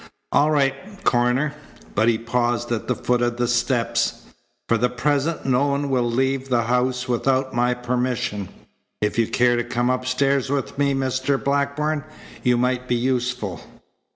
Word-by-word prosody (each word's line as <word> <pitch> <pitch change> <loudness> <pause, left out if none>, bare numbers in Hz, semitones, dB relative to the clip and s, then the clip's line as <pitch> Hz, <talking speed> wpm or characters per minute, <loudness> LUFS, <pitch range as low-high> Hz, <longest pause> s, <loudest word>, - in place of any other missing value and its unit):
All 150 - +4
right, 140 -3 +3 0.3
Coroner." 125 +4 +2 0.4
But 110 +2 +2
he 115 -1 +3
paused 120 +1 -1
at 115 - -2
the - - +1
foot 125 0 0
of 120 0 0
the 120 0 +1
steps. 120 0 0 0.4
"For 115 - +3
the 125 +2 +2
present 145 +5 0
no 135 +1 +2
one 140 0 -1
will 125 -2 +1
leave 135 +2 0
the 120 -2 +2
house 125 +2 0
without 130 +2 +1
my 125 +1 +2
permission. 125 -5 -2 0.5
If 105 +2 0
you 115 - +3
care 120 0 +3
to 120 - 0
come 120 +1 0
upstairs 130 +2 +1
with 135 -7 -2
me, 140 -1 +2
Mr. 130 +1 0
Blackburn, 140 +2 0 0.4
you 125 -1 +3
might 125 +1 0
be 125 - +1
useful." 125 -5 -1
125 Hz, 160 wpm, -22 LUFS, 120-135 Hz, 0.5 s, All